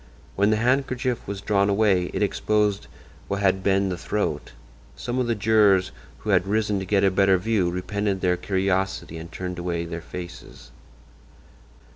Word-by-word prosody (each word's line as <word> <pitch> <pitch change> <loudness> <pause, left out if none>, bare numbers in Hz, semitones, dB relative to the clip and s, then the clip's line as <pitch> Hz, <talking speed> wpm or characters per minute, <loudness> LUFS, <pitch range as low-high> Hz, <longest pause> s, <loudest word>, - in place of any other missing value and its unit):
When 100 +1 +3
the 110 - +3
handkerchief 125 0 0
was 100 0 -5
drawn 100 -1 +2
away 100 -3 +3
it - - -1
exposed 105 0 0 0.4
what 100 - -2
had 95 0 +2
been 95 0 +2
the 90 -2 -4
throat. 105 +2 -2 0.4
Some 125 +1 -3
of 125 - 0
the 115 - +1
jurors 105 -3 +3 0.3
who - - -2
had 95 - +3
risen 105 -1 0
to 95 - -5
get 100 0 +2
a 95 - +4
better 95 0 +4
view 100 -2 +1
repented 95 +2 -2
their 90 -1 +2
curiosity 95 -2 -1
and 85 +1 -9
turned 90 -1 -5
away 85 -1 -2
their 85 0 -6
faces. 90 0 -10
100 Hz, 165 wpm, -24 LUFS, 90-105 Hz, 0.4 s, a